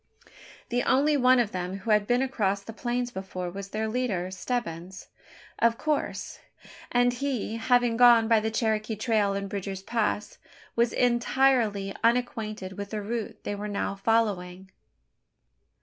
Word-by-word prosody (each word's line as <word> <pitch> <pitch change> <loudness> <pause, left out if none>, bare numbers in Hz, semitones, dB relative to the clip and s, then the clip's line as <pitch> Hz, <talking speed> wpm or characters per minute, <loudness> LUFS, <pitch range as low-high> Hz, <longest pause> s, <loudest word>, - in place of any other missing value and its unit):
The 245 0 +1
only 285 +5 +3
one 255 -1 +5
of 225 -3 +1
them 180 +1 -4
who 200 +3 -3
had 210 -1 +3
been 245 +2 +2
across 200 -7 -1
the 225 - -8
plains 245 +1 -2
before 185 -3 -5
was 195 +1 -7
their 215 +2 -2
leader 215 -6 -2
Stebbins, 190 -4 -4 0.5
of 230 0 +3
course 305 -2 -2 0.5
and 245 0 +3
he, 245 -4 -2
having 240 0 +2
gone 240 -2 +7
by 225 -1 +5
the 220 +1 -1
Cherokee 220 -1 -1
trail 210 -2 +1
and 200 0 -3
Bridger's 195 -1 -5
Pass, 215 -1 -2 0.4
was 235 0 +2
entirely 240 -4 +2
unacquainted 215 -5 -1
with 200 0 -5
the 215 0 -3
route 225 +1 -4
they - - -3
were 205 +1 -5
now 200 -1 -2
following. 195 -3 -1
220 Hz, 150 wpm, -27 LUFS, 200-245 Hz, 0.5 s, gone